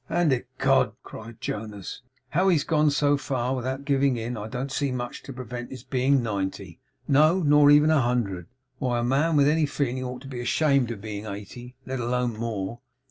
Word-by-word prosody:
'And 170 -2 +2
ecod,' 130 -2 +1
cried 115 0 -10
Jonas, 105 -1 -6 0.3
'now 180 +5 +3
he's 165 -6 +3
gone 155 -2 +3
so 145 0 +2
far 130 -2 -2
without 130 +2 -4
giving 140 -2 +2
in, 115 +2 -4
I 105 -1 -5
don't 125 +4 -4
see 140 -1 -1
much 120 -1 -4
to - - -9
prevent 125 -1 -7
his 130 -3 -9
being 130 0 +2
ninety; 95 -4 -4 0.3
no, 155 +6 +4
nor 145 -1 +6
even 150 +2 +6
a 155 -3 +4
hundred. 110 -8 -1 0.3
Why, 125 -3 0
a 120 - 0
man 140 +6 +2
with 145 -1 +5
any 155 0 +3
feeling 130 -3 -2
ought 125 0 -6
to - - -9
be 125 -3 -5
ashamed 140 0 +2
of 115 -4 -6
being 105 0 -6
eighty, 110 +5 -8
let 130 0 -4
alone 120 0 0
more. 110 -1 -4
125 Hz, 190 wpm, -26 LUFS, 115-140 Hz, 0.3 s, nor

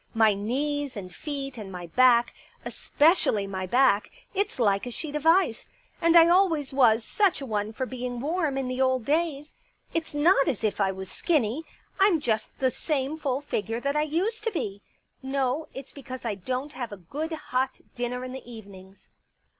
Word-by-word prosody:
My 220 -2 +5
knees 270 +6 -2
and 185 -3 -7
feet 275 -4 -5
and 200 -3 -7
my 180 -1 -7
back 240 +5 +4 0.2
— - - -30
especially 295 - +2
my 190 -1 -4
back; 245 -2 +3 0.2
it's 400 +1 -1
like 200 -1 +2
a - - -3
sheet 295 +5 -5
of 300 +1 -1
ice. 330 -8 +3 0.3
And 335 +1 +5
I 330 0 +8
always 340 -6 +3
was 230 -4 +4
such 400 -4 +2
a 275 - -5
one 210 -3 -2
for 260 +4 -3
being 250 -1 -5
warm 305 0 -1
in 270 -1 -1
the 255 +1 -2
old 260 -3 +2
days. 300 0 -1 0.4
It's 330 -2 -3
not 295 -1 +4
as 230 - -1
if 215 -1 0
I 195 -1 +2
was 190 0 -7
skinny 300 -3 0 0.2
— - - -33
Vm 385 -4 +5
just 220 -6 -2
the 260 -1 +1
same 285 +1 -2
full 275 -2 -1
figure 225 -4 -3
that 280 +3 -1
I 300 - +3
used 350 +9 -1
to 455 - +1
be. 205 - -4 0.4
No, 265 +2 -1
it's 270 0 -9
because 260 -3 -9
I 225 - 0
don't 255 +9 -4
have 245 -3 -5
a 205 - -7
good 290 - -5
hot 260 -4 -1 0.3
dinner 245 +1 -3
in 255 - -6
the 255 -2 -9
evenings." 195 -3 -13
260 Hz, 195 wpm, -26 LUFS, 220-300 Hz, 0.4 s, I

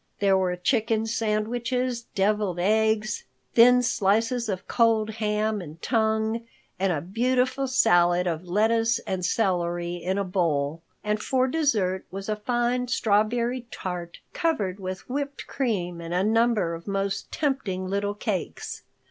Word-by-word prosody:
There 195 -1 +3
were 185 -1 +1
chicken 225 +3 +1
sandwiches, 235 +3 -1
deviled 205 -2 +1
eggs, 215 +2 +1 0.3
thin 250 +1 +7
slices 225 +2 +1
of 185 -2 -4
cold 225 -2 +2
ham 215 -1 -1
and 160 -1 -10
tongue, 220 +1 0 0.3
and 195 0 +2
a 155 -4 -1
beautiful 250 - 0
salad 175 -8 +4
of 165 -1 -2
lettuce 225 +4 +2
and 185 -1 -2
celery 175 -3 0
in 185 +3 -2
a 200 - +1
bowl. 165 -5 0 0.2
And 210 0 -1
for 260 -1 +1
dessert 225 - 0
was 195 +3 -6
a 215 - +1
fine 240 +3 0
strawberry 235 +2 +1
tart 175 -4 -5 0.2
covered 210 - -1
with 185 0 -6
whipped 280 +2 -4
cream 180 -10 -2
and 170 +1 -4
a 180 - +2
number 220 -5 +2
of 165 +3 -8
most 195 0 -2
tempting 260 -11 -1
little 200 +1 -1
cakes. 205 -4 -4
210 Hz, 140 wpm, -26 LUFS, 185-235 Hz, 0.3 s, thin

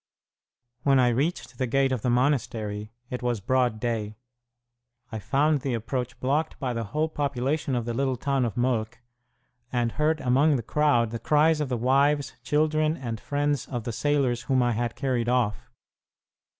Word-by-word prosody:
When 135 0 +4
I 125 -1 +4
reached 135 +1 -2
the 130 - 0
gate 135 +2 +2
of 130 -4 -1
the 125 - 0
monastery, 120 -5 0 0.2
it 125 - -3
was 120 -2 -1
broad 120 +1 +1
day. 110 -2 -2 1.0
I 110 - -4
found 140 +7 +1
the 130 -2 -1
approach 125 +2 -4
blocked 145 +5 0
by 130 -4 -2
the 115 -1 -3
whole 150 +10 -1
population 140 -1 -1
of 120 -2 -1
the 120 - -2
little 130 +1 0
town 135 +1 0
of 120 0 -2
Molk, 120 -2 0 0.7
and 120 -2 0
heard 155 +3 +1
among 140 +4 +3
the 120 - -2
crowd 120 -5 +2
the 115 - -4
cries 155 +3 +3
of 145 - -2
the 125 - -1
wives, 140 +3 +2
children, 155 +1 +1
and 115 -4 -5
friends 145 0 -1
of 120 -3 -4
the 115 - -4
sailors 130 -1 +1
whom 130 -1 +1
I 120 - +2
had 120 0 -2
carried 125 -2 -1
off. 120 -4 0
125 Hz, 175 wpm, -26 LUFS, 120-145 Hz, 1.0 s, When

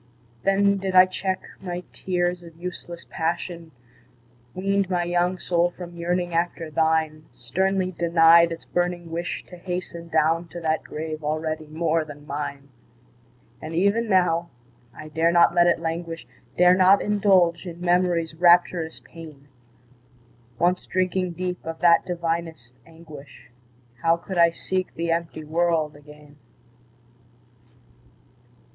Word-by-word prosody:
Then 200 0 +3
did 190 -1 -3
I 185 0 +9
check 185 0 -3 0.2
my 180 -1 -5
tears 175 -1 -1
of 165 -2 -14
useless 175 -1 -7
passion, 170 0 -3 0.9
Weaned 195 0 0
my 175 -2 0
young 175 +1 0
soul 175 0 +1
from 175 -1 -10
yearning 175 +1 -2
after 165 -1 -2
thine, 160 0 0
Sternly 185 +9 -1
denied 170 -1 +5
its 165 - -7
burning 175 -1 -2
wish 170 +1 -4
to 180 - -12
hasten 175 -1 -6
Down 165 +1 +1
to 175 - -8
that 160 -1 0
grave 155 0 -6
already 155 +1 -3
more 160 +1 0
than 145 -1 -12
mine! 140 -1 -5 0.9
And 160 +1 -6
even 200 +6 +1
now, 175 -3 +2 0.4
I 155 +5 -11
dare 160 +2 +1
not 170 0 +5
let 175 0 +4
it 170 - +2
languish, 165 0 -4 0.3
Dare 180 0 +6
not 190 +2 +5
indulge 190 -4 +2
in 170 -1 -8
Memory's 175 -2 +1
rapturous 175 -1 +3
pain; 155 -4 -13 1.1
Once 180 +4 +1
drinking 185 -1 -1
deep 180 +1 -4
of 165 0 -6
that 170 -1 +5
divinest 165 -7 -3
anguish, 145 -7 -14 0.5
How 165 0 +3
could 175 +1 -5
I 170 0 +7
seek 185 +2 -4
the 165 0 -2
empty 165 -1 -3
world 160 -1 0
again? 150 0 -16
170 Hz, 130 wpm, -24 LUFS, 160-180 Hz, 1.1 s, I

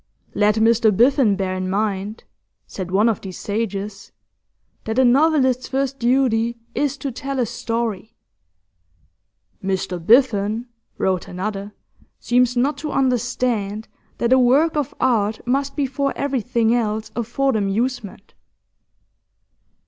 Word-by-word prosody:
'Let 210 0 +3
Mr 225 0 +4
Biffen 240 0 +4
bear 190 -1 -2
in 185 0 -3
mind,' 205 +1 -2 0.4
said 185 -2 -6
one 200 +5 +3
of 225 - 0
these 185 -3 -8
sages, 205 -1 -4 0.7
'that 220 +2 -3
a 260 - +5
novelist's 260 -1 +3
first 270 0 -2
duty 235 -2 +1 0.2
is 285 -1 -1
to 275 0 -4
tell 275 +2 -5
a 250 - +2
story.' 230 -2 -3 1.5
'Mr 185 -2 -2
Biffen,' 225 0 +3 0.3
wrote 185 -2 0
another, 200 +2 -5 0.5
'seems 245 0 +2
not 275 +5 +1
to 305 - -4
understand 245 -5 -1 0.3
that 235 +2 +2
a 260 - +5
work 275 +7 +3
of 295 -4 -2
art 220 -3 +1
must 275 +3 -1
before 275 -1 -1
everything 245 -4 0
else 220 -2 -1
afford 240 +3 0
amusement. 210 0 -2
235 Hz, 120 wpm, -21 LUFS, 205-260 Hz, 1.5 s, a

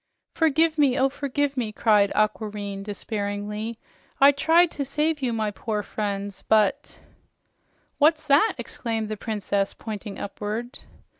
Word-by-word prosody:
"Forgive 320 0 +2
me! 275 -4 +4
Oh, 270 +1 +3
forgive 280 +1 -2
me!" 235 -5 -2
cried 210 -2 +3
Aquareine 210 -2 -1
despairingly. 210 +1 -4 0.4
"I 275 +1 +8
tried 325 +4 +4
to 285 - -3
save 300 +2 -1
you, 255 -2 0
my 220 -2 -1
poor 210 0 -3
friends, 200 -1 -4
but 220 +6 +2 0.5
" - - -43
"What's 310 +1 +4
that?" 300 +9 +4
exclaimed 225 -3 -4
the 215 - -2
Princess, 205 -2 -2
pointing 210 -2 -7
upward. 215 +5 -5
225 Hz, 135 wpm, -25 LUFS, 210-285 Hz, 0.5 s, I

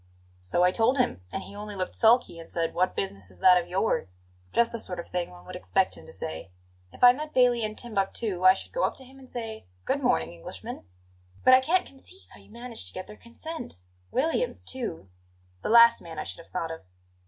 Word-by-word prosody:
"So 90 - +1
I 180 - +5
told 230 +7 +2
him, 250 - +1
and 195 - -4
he 200 - -11
only 210 0 -7
looked 185 -1 -3
sulky 230 -6 +4
and 165 - -11
said: 165 -1 -1
'What 185 +1 +1
business 95 -1 -3
is 90 - -16
that 180 -1 +7
of 170 - -11
yours?' 175 - -1 0.3
Just 235 0 +3
the 235 - -4
sort 180 -4 -5
of 170 - -6
thing 180 -1 -2
one 90 0 -14
would - - -8
expect 90 0 +1
him - - -14
to - - -11
say. 80 +4 -6 0.4
If - - -9
I 245 0 +10
met 300 +3 -7
Bailey 245 -2 +4
in 215 -1 -2
Timbuctoo, 200 -4 -2
I 185 0 +8
should - - -8
go - - -1
up - - +1
to 265 - -10
him 265 +1 -16
and 260 -1 -15
say: 225 - -6 0.2
'Good - - 0
morning, 80 +1 +1
Englishman.'" 85 +2 -8 0.6
"But 255 - +7
I 255 - +8
can't 350 +7 +2
conceive 320 +8 -14
how - - -14
you - - -20
managed 235 +1 -5
to - - -8
get 185 - -5
their 210 - -11
consent; 245 - -8 0.3
Williams, 325 - 0
too; 230 - -5 0.5
the - - -3
last 235 +1 +7
man 165 -2 -9
I 155 - -2
should - - -7
have 165 - -14
thought 165 -3 -3
of." 165 - -7
210 Hz, 230 wpm, -27 LUFS, 170-245 Hz, 0.6 s, I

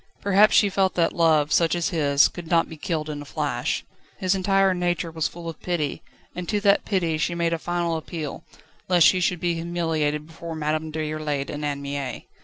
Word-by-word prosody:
Perhaps 200 +2 +5
she 205 - +6
felt 190 -1 +1
that 170 -1 +2
love, 155 -3 +3
such 170 0 +3
as 170 -1 0
his, 145 -5 +4
could 175 -2 -9
not 165 0 +3
be 160 - -9
killed 155 0 -3
in 150 -1 -5
a - - -9
flash. - - -2 0.3
His 185 0 +1
entire 195 0 +3
nature 175 -1 -1
was 160 -1 -1
full 170 -1 -9
of 165 -2 -7
pity, 165 -5 -2 0.3
and 180 -1 -5
to 210 - +1
that 200 -1 +3
pity 170 -6 0
she 170 +2 0
made 170 -1 0
a 165 - -1
final 175 0 -1
appeal, 160 -2 -5 0.5
lest 175 -3 +5
she 185 - +5
should 180 0 0
be 175 0 0
humiliated 165 -3 -1
before 165 +1 -8
Madame 155 +1 -2
Déroulède 155 -2 -3
and 145 +1 -5
Anne 140 -1 -2
Mie. 140 -3 -4
165 Hz, 205 wpm, -24 LUFS, 155-175 Hz, 0.5 s, she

